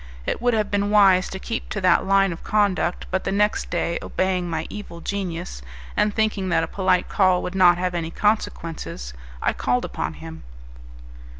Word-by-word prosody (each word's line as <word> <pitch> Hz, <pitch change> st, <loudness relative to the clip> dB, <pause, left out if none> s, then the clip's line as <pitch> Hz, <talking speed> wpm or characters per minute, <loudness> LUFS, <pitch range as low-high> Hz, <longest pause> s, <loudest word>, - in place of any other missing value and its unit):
It -, -, -2 dB
would 245 Hz, -1 st, +2 dB
have 215 Hz, -2 st, -1 dB
been 205 Hz, 0 st, +1 dB
wise 195 Hz, -3 st, +5 dB
to 190 Hz, -, -5 dB
keep 230 Hz, +4 st, -5 dB
to 210 Hz, -, -3 dB
that 185 Hz, +1 st, +3 dB
line 195 Hz, -2 st, +3 dB
of 165 Hz, -, -11 dB
conduct; 195 Hz, -5 st, +1 dB
but 190 Hz, 0 st, 0 dB
the -, -, -2 dB
next 210 Hz, +1 st, +1 dB
day, 170 Hz, -1 st, -1 dB
obeying 185 Hz, -2 st, -1 dB
my 160 Hz, -1 st, -2 dB
evil 205 Hz, -5 st, -8 dB
genius, 175 Hz, -, -4 dB, 0.3 s
and 210 Hz, -, +2 dB
thinking 210 Hz, -3 st, 0 dB
that 165 Hz, -, +2 dB
a -, -, -2 dB
polite 185 Hz, -2 st, +1 dB
call 185 Hz, -3 st, +2 dB
could 180 Hz, -, -4 dB
not 180 Hz, -2 st, +5 dB
have 180 Hz, 0 st, -1 dB
any 165 Hz, -2 st, -2 dB
consequences, 165 Hz, -, -2 dB, 0.3 s
I -, -, +2 dB
called -, -, 0 dB
upon -, -, -4 dB
him. 80 Hz, -1 st, -9 dB
185 Hz, 185 wpm, -23 LUFS, 175-205 Hz, 0.3 s, wise